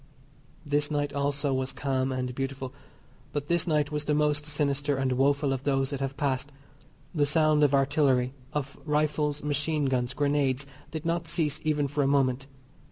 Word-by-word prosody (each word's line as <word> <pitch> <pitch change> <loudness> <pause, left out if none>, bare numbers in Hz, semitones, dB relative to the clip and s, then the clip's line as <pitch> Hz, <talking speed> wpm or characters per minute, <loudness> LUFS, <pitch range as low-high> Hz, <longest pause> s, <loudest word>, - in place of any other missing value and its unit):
This 145 0 +1
night 145 -1 -1
also 140 0 0
was 130 0 -1
calm 135 -1 -1
and 125 -1 -2
beautiful, 135 0 -4 0.6
but 145 -1 -3
this 170 0 +2
night 150 -2 +1
was 150 0 -2
the 150 - +1
most 150 0 +1
sinister 145 -1 0
and 135 -1 0
woeful 140 +2 +2
of 135 0 -4
those 135 -1 +1
that 140 - -3
have 135 0 -3
passed. 140 -1 -1 0.6
The 145 -4 +2
sound 155 0 +3
of 145 -1 +4
artillery, 135 -2 +2 0.2
of 140 -2 -4
rifles, 150 -1 0
machine 150 +1 0
guns, 130 -1 0
grenades, 140 -2 +1 0.2
did 160 0 -6
not 170 0 -1
cease 155 -2 0
even 150 -2 +1
for 145 +2 -1
a 135 - +2
moment. 135 -1 +2
145 Hz, 170 wpm, -28 LUFS, 135-150 Hz, 0.6 s, of